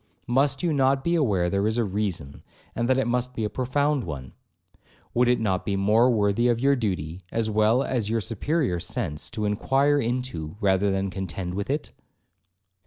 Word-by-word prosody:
Must 135 +3 +1
you 170 -3 +1
not 135 -1 +2
be 170 - +1
aware 105 - +2
there 100 +3 +1
is 110 +2 0
a 120 - +2
reason, 95 -8 -3 0.3
and 120 +1 -1
that 130 - +4
it 135 - +1
must 125 +1 -1
be 110 - -2
a 105 - -2
profound 140 +3 0
one? 65 - -7 0.8
Would 125 +1 +3
it 125 0 +3
not 95 -5 0
be 100 - -1
more 105 +5 +4
worthy 110 0 +2
of 120 -1 +2
your 140 +2 +3
duty, 90 - -3
as 110 -1 -1
well 110 +4 +3
as 120 -7 -1
your 115 +1 +1
superior 115 - -1
sense, 75 -2 -3
to 110 -3 -3
inquire 135 +7 +2
into, 120 - -3
than 95 -1 +1
contend 90 0 -4
with 100 +4 -4
it?' 145 +2 -2
110 Hz, 180 wpm, -25 LUFS, 95-130 Hz, 0.8 s, that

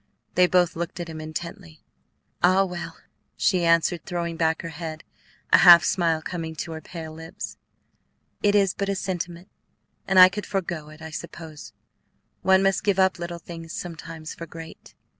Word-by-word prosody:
They 180 0 +5
both 180 -2 +2
looked 170 +1 -4
at 170 -1 -5
him 160 -1 -7
intently. 155 - -8 0.6
"Ah, 185 +2 +5
well," 175 -3 -6 0.4
she 185 -4 +2
answered, 165 +1 +2
throwing 170 -2 -3
back 160 -1 0
her 165 - -5
head, 160 -1 -7 0.5
a - - +9
half 175 -2 +9
smile 165 -3 +1
coming 165 -2 -5
to 165 +2 -5
her 160 0 -6
pale 160 -2 -8
lips, 165 +5 -8 0.8
"it 205 0 +3
is 195 -3 +3
but 200 0 -3
a 200 - 0
sentiment, 180 -1 -4 0.6
and 190 - +2
I 185 0 +11
could 205 +3 -5
forego 170 -6 -3
it, 155 +1 -13
I 160 - -7
suppose. 160 -1 -8 0.7
One 190 0 +4
must 195 0 +2
give 200 -2 +1
up 190 -2 +3
little 170 0 -5
things 165 -1 -9
sometimes 165 -2 -7
for 170 - -9
great." 165 -1 -11
170 Hz, 170 wpm, -25 LUFS, 160-185 Hz, 0.8 s, I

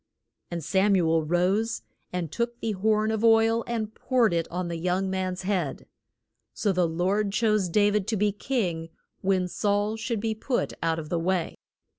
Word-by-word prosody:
And 170 -2 -4
Sam 195 +5 +3
u 175 -3 +2
el 165 0 +3
rose, 185 +8 0 0.3
and 175 -4 -3
took 235 +3 -2
the 225 - -1
horn 215 +2 +1
of 220 0 -1
oil 225 0 +4
and 220 -2 -3
poured 245 -7 +2
it 165 -1 0
on 180 +1 -3
the 170 -1 -3
young 185 +3 0
man's 185 -1 -2
head. 185 -7 -2 0.7
So 205 - +1
the 180 -2 +2
Lord 190 +5 0
chose 215 -3 +2
Da 205 +3 +3
vid 210 -1 0
to 225 - 0
be 205 +1 +2
king 190 -8 -2 0.3
when 190 -1 +1
Saul 205 +3 0
should 230 0 -2
be 220 +1 -1
put 240 +4 -2
out 165 -1 +1
of 155 -2 -6
the 170 - 0
way. 175 0 0
195 Hz, 185 wpm, -26 LUFS, 175-220 Hz, 0.7 s, oil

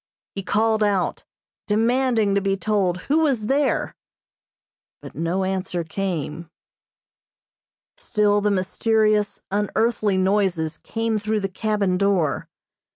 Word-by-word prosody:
He 195 - -4
called 220 +3 +1
out, 200 -3 0 0.4
demanding 225 -1 +2
to 200 - +2
be 195 0 0
told 190 -4 0
who 300 +3 +1
was 270 -9 +1
there, 275 +4 0 1.0
but - - -11
no 170 +4 -1
answer 185 -2 -2
came. 170 -2 -4 1.5
Still 210 - +1
the 210 - +2
mysterious, 210 +2 +1
unearthly 210 0 +1
noises 185 -5 +1
came 225 -1 -2
through 215 0 -1
the 195 - -2
cabin 200 -2 0
door. 195 -7 +1
205 Hz, 110 wpm, -23 LUFS, 190-220 Hz, 1.5 s, demanding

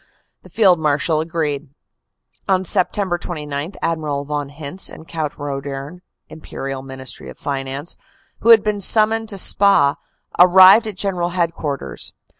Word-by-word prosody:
The - - -17
Field 190 -6 +3
Marshal 150 +1 0
agreed. 155 -3 -3 0.8
"On 190 -1 +2
Sept. 185 0 0
29 150 0 -5
Admiral 150 -4 -2
von 145 -1 -4
Hintze 145 +5 -4
and 160 - -13
Count 155 -3 -4
Roedern 140 +3 -6 0.3
(Imperial 135 -3 -7
Ministry 130 -1 -6
of - - -12
Finance), 140 +2 -4 0.4
who 230 - 0
had 225 -3 +8
been 210 -1 -2
summoned 220 +2 +3
to 200 - -6
Spa, 195 -7 +4 0.4
arrived 185 +5 +7
at 205 -3 -7
General 180 -3 -1
Headquarters. 165 -5 -3
160 Hz, 130 wpm, -19 LUFS, 140-185 Hz, 0.8 s, had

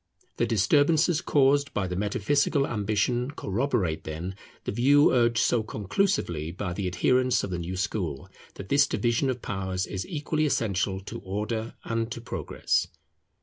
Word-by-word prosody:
The 120 - +1
disturbances 145 - +3
caused 140 0 +2
by 95 -3 0
metaphysical 110 - +1
ambition 110 +3 0
corroborate, 100 - -1
then, 80 +4 -5 0.3
the - - -3
view 140 +7 +4
urged 120 -2 +3
so 115 0 +3
conclusively 105 - -1
by 90 0 -4
the 95 +1 -2
adherents 125 +6 +2
of 100 - -4
the 90 - -2
new 90 +2 -4
school, 90 -7 -3 0.3
that 95 - -9
this 140 0 +4
division 120 +3 +1
of 125 -2 -3
powers 95 -1 -2
is 95 - -5
equally 155 -1 -1
essential 100 -6 0
to 100 - -7
Order 110 +4 -4
and 115 0 -2
to - - -7
Progress. 115 - -1
110 Hz, 145 wpm, -27 LUFS, 95-135 Hz, 0.3 s, view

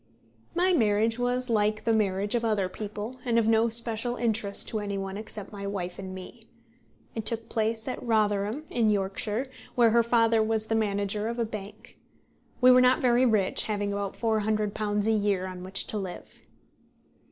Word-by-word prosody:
My 365 +2 +3
marriage 225 -3 +2
was 250 +1 0
like 215 -2 +1
the 230 - +2
marriage 205 -1 +1
of 235 -1 0
other 210 -4 +1
people, 210 +5 -6
and 235 -2 +1
of 225 -2 +3
no 225 +1 +3
special 230 +1 -2
interest 220 -4 0
to 220 - -2
any 200 -1 -3
one 195 0 -4
except 210 -1 -7
my 200 -1 -6
wife 180 -2 -4
and 190 -1 -6
me. 185 -1 -11 0.6
It 225 - -4
took 230 +1 +2
place 220 0 -1
at 255 - -4
Rotherham 215 +2 0
in 230 -3 +2
Yorkshire, 205 +4 -1 0.3
where 235 -2 +5
her 235 +1 +5
father 230 -1 +3
was 220 0 0
the 225 - -2
manager 205 -1 0
of 235 +1 -3
a 235 - 0
bank. 210 -2 -9 0.6
We 255 0 +8
were 250 0 +7
not 255 +3 +4
very 250 -2 +3
rich, 210 -5 +1
having 205 -1 -2
about 200 -1 -3
£400 215 -2 0
a 225 - +3
year 205 -3 +1
on 185 -1 -7
which 190 +1 -1
to 215 - -3
live. 185 -3 -8
215 Hz, 180 wpm, -27 LUFS, 205-230 Hz, 0.6 s, We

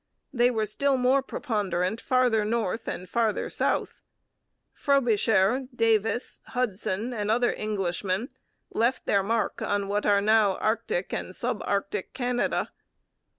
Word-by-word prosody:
They 240 -1 +4
were 220 -3 0
still 270 +6 +1
more 255 +2 +3
preponderant 205 -5 -2
farther 250 -5 +2
north 220 -1 -1
and 180 - -4
farther 225 -1 0
south. - - -1 0.7
Frobisher, 240 -3 +2
Davis, 225 0 +1
Hudson, 225 -1 -2
and 210 -2 -2
other 240 +2 +2
Englishmen 195 +1 -2 0.4
left 235 +3 0
their 200 - +3
mark 225 +3 -1
on 200 -1 -1
what 205 +1 -1
are 205 -1 +5
now 210 -1 +3
Arctic 215 -4 -1
and 185 - -4
sub 240 -3 -2
Arctic 200 0 -2
Canada. 245 -1 -1
220 Hz, 125 wpm, -27 LUFS, 200-245 Hz, 0.7 s, are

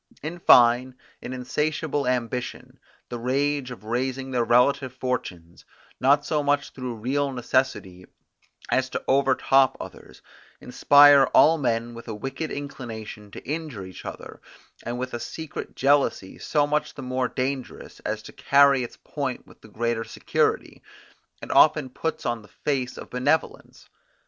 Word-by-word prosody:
In 165 +3 -5
fine, 125 -2 +5 0.3
an - - -7
insatiable 145 +3 -2
ambition, 125 +1 -3 0.3
the 120 - -5
rage 140 +2 0
of 120 -5 -10
raising 130 +4 -3
their 125 -2 +1
relative 125 +2 +2
fortunes, 90 -10 -5 0.4
not 145 +2 +3
so 150 -1 0
much 145 0 0
through 125 -2 -6
real 135 +5 -1
necessity, 120 -7 -1 0.7
as 130 0 +1
to - - -4
over 135 0 +3
top 135 -1 +3
others, - - -11 0.4
inspire 145 +2 +6
all 160 +1 +6
men 120 -3 -1
with 115 0 -11
a 110 - -5
wicked 135 +7 -5
inclination 115 -7 -7
to 100 - -11
injure 150 - -4
each 95 - -11
other, - - -9 0.4
and 120 +1 -4
with 130 +1 -5
a 120 - -3
secret 160 +4 -7
jealousy 135 -8 +1
so 150 -2 +1
much 150 +1 -1
the 135 - -8
more 130 0 -1
dangerous, 130 +1 -5
as 110 +1 -4
to - - -11
carry 140 -1 +4
its 120 - -7
point 135 -4 -4
with - - -19
the - - -14
greater 115 +1 -2
security, 115 - -1 0.6
it - - -6
often 150 -3 +4
puts 160 +5 -4
on 120 -1 -1
the 105 - -17
face 130 +6 -3
of - - -10
benevolence. 140 +6 -1
130 Hz, 150 wpm, -25 LUFS, 120-140 Hz, 0.7 s, inspire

